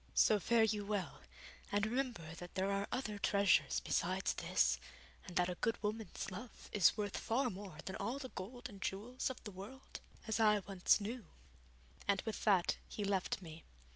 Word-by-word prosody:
So 215 Hz, -, +6 dB
fare 230 Hz, +3 st, +4 dB
you 210 Hz, -1 st, +1 dB
well, 200 Hz, -2 st, -2 dB, 0.5 s
and 205 Hz, +1 st, +2 dB
remember 230 Hz, -9 st, -2 dB
that 175 Hz, 0 st, -9 dB
there 190 Hz, +1 st, +1 dB
are 200 Hz, 0 st, 0 dB
other 215 Hz, -5 st, -2 dB
treasures 200 Hz, -2 st, +4 dB
besides -, -, +1 dB
this, 60 Hz, 0 st, +2 dB, 0.5 s
and 180 Hz, -, -8 dB
that 175 Hz, 0 st, +3 dB
a 180 Hz, -, -1 dB
good 225 Hz, +5 st, 0 dB
woman's 210 Hz, -2 st, -3 dB
love 220 Hz, +6 st, -9 dB
is 200 Hz, 0 st, +5 dB
worth 205 Hz, -2 st, -2 dB
far 250 Hz, +2 st, +1 dB
more 190 Hz, -4 st, -8 dB
than 190 Hz, +2 st, -4 dB
all 250 Hz, +4 st, -2 dB
the 265 Hz, -2 st, -6 dB
gold 245 Hz, +6 st, -6 dB
and 200 Hz, -4 st, -12 dB
jewels 230 Hz, +9 st, -2 dB
of 260 Hz, -, -7 dB
the 210 Hz, -, -6 dB
world 200 Hz, +8 st, -9 dB, 0.3 s
as 220 Hz, -, 0 dB
I 210 Hz, -1 st, +6 dB
once 195 Hz, 0 st, +4 dB
knew.' 215 Hz, -1 st, -5 dB, 0.8 s
And 200 Hz, -1 st, +3 dB
with 220 Hz, -, -4 dB
that 195 Hz, -5 st, +4 dB
he 210 Hz, -, -3 dB
left 195 Hz, -1 st, 0 dB
me. 160 Hz, -1 st, -9 dB
205 Hz, 180 wpm, -37 LUFS, 190-225 Hz, 0.8 s, So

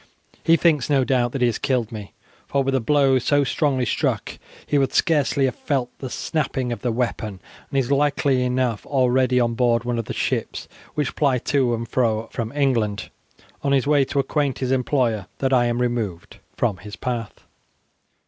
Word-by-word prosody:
He 165 Hz, 0 st, +5 dB
thinks, 155 Hz, -7 st, +2 dB
no 140 Hz, -2 st, +3 dB
doubt, 125 Hz, -2 st, +1 dB
that 135 Hz, -, -3 dB
he -, -, +5 dB
has 115 Hz, -, -1 dB
killed 125 Hz, -5 st, 0 dB
me, 105 Hz, -3 st, -8 dB, 0.3 s
for 140 Hz, -1 st, +1 dB
with 135 Hz, 0 st, -1 dB
a 130 Hz, -, +3 dB
blow 135 Hz, +1 st, +3 dB
so 145 Hz, +3 st, +2 dB
strongly 135 Hz, -2 st, 0 dB
struck -, -, -1 dB, 0.3 s
he 145 Hz, -, +1 dB
would 135 Hz, -, 0 dB
scarcely 145 Hz, -4 st, +2 dB
have 130 Hz, -, 0 dB
felt 130 Hz, -4 st, -2 dB
the 130 Hz, -, -5 dB
snapping 135 Hz, -4 st, -2 dB
of 115 Hz, -4 st, -4 dB
the 120 Hz, -, 0 dB
weapon, 110 Hz, -4 st, -2 dB, 0.3 s
and 140 Hz, -, -2 dB
is 135 Hz, 0 st, 0 dB
likely 140 Hz, -2 st, +2 dB
enough 125 Hz, -3 st, 0 dB
already 130 Hz, -1 st, +2 dB
on 120 Hz, -1 st, +1 dB
board 115 Hz, -1 st, +2 dB
one 120 Hz, -1 st, -1 dB
of 115 Hz, -, -3 dB
the -, -, -6 dB
ships -, -, -2 dB, 0.3 s
which 150 Hz, -, -1 dB
ply 140 Hz, -4 st, +2 dB
to 125 Hz, -1 st, +1 dB
and 115 Hz, +1 st, -5 dB
fro 115 Hz, -3 st, 0 dB
from 115 Hz, -1 st, -4 dB
England 120 Hz, -8 st, 0 dB, 0.5 s
on 140 Hz, -1 st, +1 dB
his 135 Hz, -1 st, +2 dB
way 145 Hz, -1 st, +4 dB
to 140 Hz, -, -5 dB
acquaint 140 Hz, -1 st, 0 dB
his 130 Hz, -1 st, -2 dB
employer 125 Hz, -6 st, 0 dB
that 135 Hz, -1 st, 0 dB
I 120 Hz, -1 st, +4 dB
am 120 Hz, 0 st, 0 dB
removed 115 Hz, -8 st, -2 dB, 0.2 s
from 110 Hz, -6 st, 0 dB
his 100 Hz, +4 st, -9 dB
path." 120 Hz, -4 st, -5 dB
125 Hz, 190 wpm, -22 LUFS, 120-140 Hz, 0.5 s, He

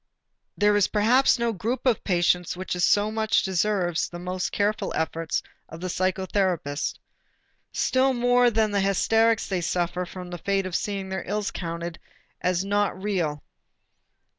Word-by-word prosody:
There 205 Hz, 0 st, +4 dB
is 205 Hz, -2 st, +4 dB
perhaps 240 Hz, +6 st, +4 dB
no 235 Hz, -1 st, 0 dB
group 225 Hz, +8 st, -3 dB
of 250 Hz, -4 st, +2 dB
patients 180 Hz, -1 st, +1 dB
which 185 Hz, 0 st, -4 dB
so 205 Hz, +4 st, +3 dB
much 220 Hz, 0 st, +1 dB
deserves 190 Hz, -2 st, 0 dB
the 175 Hz, -, -8 dB
most 180 Hz, +1 st, -3 dB
careful 210 Hz, +1 st, 0 dB
efforts 160 Hz, 0 st, -1 dB, 0.3 s
of 165 Hz, -, -9 dB
the 185 Hz, +1 st, -4 dB
psychotherapist. 185 Hz, -5 st, -1 dB, 0.7 s
Still 260 Hz, +1 st, +2 dB
more 245 Hz, 0 st, +4 dB
than 220 Hz, -2 st, +1 dB
the 200 Hz, -1 st, +1 dB
hysterics 225 Hz, +3 st, +2 dB
they 185 Hz, -3 st, -1 dB
suffer 175 Hz, +1 st, -1 dB
from 180 Hz, -1 st, -8 dB
the 175 Hz, -, -6 dB
fate 195 Hz, +2 st, 0 dB
of 185 Hz, -2 st, -4 dB
seeing 195 Hz, -2 st, -2 dB
their 190 Hz, -1 st, -3 dB
ills 210 Hz, +2 st, -1 dB
counted 170 Hz, -1 st, -5 dB, 0.4 s
as 180 Hz, +1 st, 0 dB
not 205 Hz, -1 st, 0 dB
real. 175 Hz, -8 st, -2 dB
190 Hz, 150 wpm, -25 LUFS, 175-210 Hz, 0.7 s, There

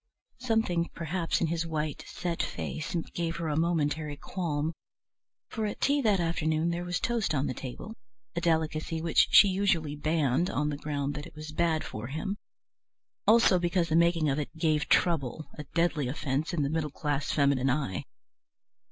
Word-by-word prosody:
Something 220 Hz, -9 st, +1 dB
perhaps 170 Hz, +1 st, -1 dB
in -, -, +3 dB
his 165 Hz, +1 st, -1 dB
white 155 Hz, -2 st, -3 dB
set 170 Hz, -2 st, -3 dB
face 155 Hz, -1 st, -4 dB, 0.2 s
gave 170 Hz, -1 st, -2 dB
her 165 Hz, -1 st, -3 dB
a 150 Hz, -, 0 dB
momentary 155 Hz, -2 st, 0 dB
qualm, 160 Hz, -2 st, -2 dB, 0.7 s
for 220 Hz, -1 st, -2 dB
at 205 Hz, -, -5 dB
tea 285 Hz, +1 st, +2 dB
that 210 Hz, -6 st, +3 dB
afternoon 165 Hz, -1 st, +1 dB
there 170 Hz, +1 st, -2 dB
was 175 Hz, -1 st, -2 dB
toast 230 Hz, -9 st, 0 dB
on 135 Hz, 0 st, +1 dB
the -, -, -1 dB
table, 135 Hz, -, -7 dB, 0.4 s
a 170 Hz, -, -1 dB
delicacy 160 Hz, -1 st, 0 dB
which 165 Hz, 0 st, +3 dB
she 205 Hz, -, +8 dB
usually 185 Hz, -6 st, +1 dB
banned 155 Hz, +1 st, +1 dB
on 150 Hz, +1 st, 0 dB
the 145 Hz, -, -2 dB
ground 145 Hz, -1 st, -2 dB
that 145 Hz, 0 st, -6 dB
it 155 Hz, -, -16 dB
was 155 Hz, 0 st, -7 dB
bad 160 Hz, 0 st, +1 dB
for 110 Hz, +2 st, -6 dB
him; 195 Hz, +9 st, -3 dB, 0.9 s
also 220 Hz, -4 st, +6 dB
because 175 Hz, -1 st, +1 dB
the 160 Hz, -, +2 dB
making 170 Hz, -1 st, +4 dB
of 140 Hz, +1 st, +1 dB
it 150 Hz, -, -3 dB
"gave 155 Hz, -2 st, +1 dB
trouble," 155 Hz, -3 st, +2 dB
a 150 Hz, -, -5 dB
deadly 165 Hz, -5 st, +2 dB
offence 140 Hz, +4 st, -2 dB
in 165 Hz, -5 st, 0 dB
the 140 Hz, -, 0 dB
middle 160 Hz, -2 st, -1 dB
class 145 Hz, 0 st, -2 dB
feminine 140 Hz, -2 st, +2 dB
eye. 130 Hz, -9 st, -1 dB
160 Hz, 175 wpm, -29 LUFS, 150-170 Hz, 0.9 s, she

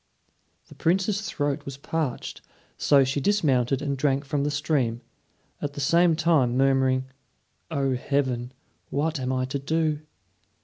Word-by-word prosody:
The -, -, -13 dB
Princess's 195 Hz, +5 st, 0 dB
throat 145 Hz, 0 st, -1 dB
was 140 Hz, -2 st, -7 dB
parched, 145 Hz, -2 st, -3 dB, 0.3 s
so 140 Hz, -2 st, +4 dB
she 135 Hz, +2 st, -1 dB
dismounted 135 Hz, -, +2 dB
and 140 Hz, -2 st, -1 dB
drank 135 Hz, 0 st, 0 dB
from 140 Hz, +1 st, -1 dB
the 145 Hz, -, +1 dB
stream, 140 Hz, -5 st, 0 dB, 0.6 s
at 145 Hz, -1 st, -3 dB
the 145 Hz, -, -7 dB
same 170 Hz, +4 st, +4 dB
time 155 Hz, -7 st, +2 dB
murmuring, 130 Hz, -1 st, +3 dB, 0.7 s
"O, 135 Hz, -1 st, 0 dB
Heaven! 125 Hz, -2 st, -1 dB, 0.4 s
what 155 Hz, +2 st, -1 dB
am 130 Hz, 0 st, -2 dB
I 130 Hz, -1 st, 0 dB
to 135 Hz, +2 st, -3 dB
do?" 155 Hz, +1 st, 0 dB
140 Hz, 140 wpm, -26 LUFS, 130-155 Hz, 0.7 s, so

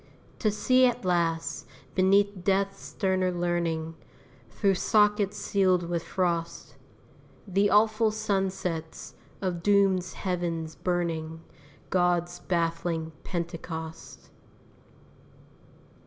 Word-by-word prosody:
To 215 Hz, -, +2 dB
see 255 Hz, +5 st, +4 dB
at 240 Hz, -5 st, -2 dB
last, 170 Hz, -2 st, 0 dB, 0.3 s
beneath 195 Hz, 0 st, +3 dB
Death's 195 Hz, +1 st, +1 dB
sterner 185 Hz, -1 st, 0 dB
learning, 170 Hz, -2 st, -1 dB, 0.6 s
Through 195 Hz, -, +1 dB
sockets 210 Hz, +1 st, +2 dB
sealed 185 Hz, -3 st, +1 dB
with 170 Hz, -1 st, -1 dB
frost, 170 Hz, -2 st, -2 dB, 0.7 s
The 200 Hz, +2 st, +2 dB
awful 215 Hz, +1 st, +4 dB
sunsets 190 Hz, -6 st, -3 dB, 0.3 s
of 180 Hz, -3 st, -2 dB
Doom's 195 Hz, -2 st, +3 dB
heavens 170 Hz, -3 st, -3 dB
burning 165 Hz, -3 st, -2 dB, 0.5 s
God's 175 Hz, -1 st, +1 dB
baffling 165 Hz, -1 st, -1 dB
pentecost. 165 Hz, -2 st, -6 dB
180 Hz, 85 wpm, -27 LUFS, 170-195 Hz, 0.7 s, see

